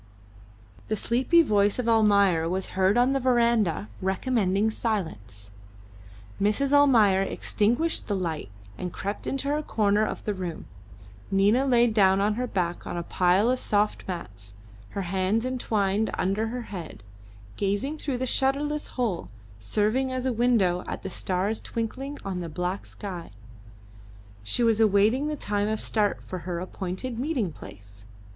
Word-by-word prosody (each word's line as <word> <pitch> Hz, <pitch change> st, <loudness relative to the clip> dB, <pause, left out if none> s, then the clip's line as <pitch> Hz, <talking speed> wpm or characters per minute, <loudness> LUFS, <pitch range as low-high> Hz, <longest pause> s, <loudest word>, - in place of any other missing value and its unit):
The 215 Hz, -, 0 dB
sleepy 260 Hz, +11 st, +3 dB
voice 205 Hz, -6 st, +2 dB
of 250 Hz, -2 st, -2 dB
Almayer 200 Hz, -7 st, +4 dB
was 190 Hz, +1 st, -2 dB
heard 190 Hz, +3 st, +3 dB
on 250 Hz, +2 st, +4 dB
the 275 Hz, -, +1 dB
verandah 235 Hz, -, +2 dB
recommending 200 Hz, +1 st, +1 dB
silence. 110 Hz, -, -4 dB, 0.9 s
Mrs. 215 Hz, +8 st, +1 dB
Almayer 230 Hz, -10 st, +5 dB
extinguished 235 Hz, +10 st, 0 dB
the 205 Hz, -, 0 dB
light 165 Hz, -, -3 dB, 0.3 s
and 180 Hz, -, -4 dB
crept 200 Hz, +4 st, -4 dB
into 275 Hz, +1 st, -2 dB
her 300 Hz, +1 st, +1 dB
corner 210 Hz, -6 st, +1 dB
of -, -, -3 dB
the 210 Hz, -, 0 dB
room. 180 Hz, -4 st, -5 dB, 0.6 s
Nina 205 Hz, +8 st, +3 dB
laid 240 Hz, -3 st, +4 dB
down 195 Hz, -2 st, +4 dB
on 205 Hz, +2 st, +2 dB
her 250 Hz, +3 st, -2 dB
back 175 Hz, -5 st, -2 dB
on -, -, -4 dB
a 170 Hz, -, -2 dB
pile 185 Hz, +7 st, +2 dB
of 255 Hz, -, 0 dB
soft 210 Hz, 0 st, 0 dB
mats, 100 Hz, -, -7 dB, 0.3 s
her 200 Hz, -, -4 dB
hands 190 Hz, +5 st, 0 dB
entwined 220 Hz, -5 st, 0 dB
under 200 Hz, +4 st, 0 dB
her 245 Hz, +2 st, -4 dB
head, 160 Hz, -, -7 dB, 0.5 s
gazing 205 Hz, +10 st, -1 dB
through 275 Hz, -4 st, -2 dB
the 260 Hz, -, -2 dB
shutterless 285 Hz, +4 st, 0 dB
hole, 200 Hz, -, -1 dB, 0.3 s
serving 215 Hz, -, +1 dB
as 255 Hz, 0 st, -2 dB
a 260 Hz, -, +1 dB
window 220 Hz, -7 st, +2 dB
at -, -, -5 dB
the 190 Hz, -, -5 dB
stars 190 Hz, +5 st, -1 dB
twinkling 265 Hz, +5 st, -4 dB
on 190 Hz, -2 st, -3 dB
the 170 Hz, -2 st, -5 dB
black 180 Hz, +5 st, -3 dB
sky; 185 Hz, -4 st, -7 dB, 1.1 s
she 105 Hz, -, 0 dB
was 225 Hz, -2 st, +3 dB
awaiting 220 Hz, +6 st, +3 dB
the 305 Hz, -, -2 dB
time 205 Hz, -6 st, -1 dB
of 220 Hz, 0 st, -1 dB
start 210 Hz, -2 st, 0 dB
for 185 Hz, -, -6 dB
her 175 Hz, 0 st, -4 dB
appointed 190 Hz, +6 st, -5 dB
meeting 255 Hz, -, -1 dB
place. 100 Hz, -4 st, -13 dB
205 Hz, 150 wpm, -26 LUFS, 185-245 Hz, 1.1 s, Almayer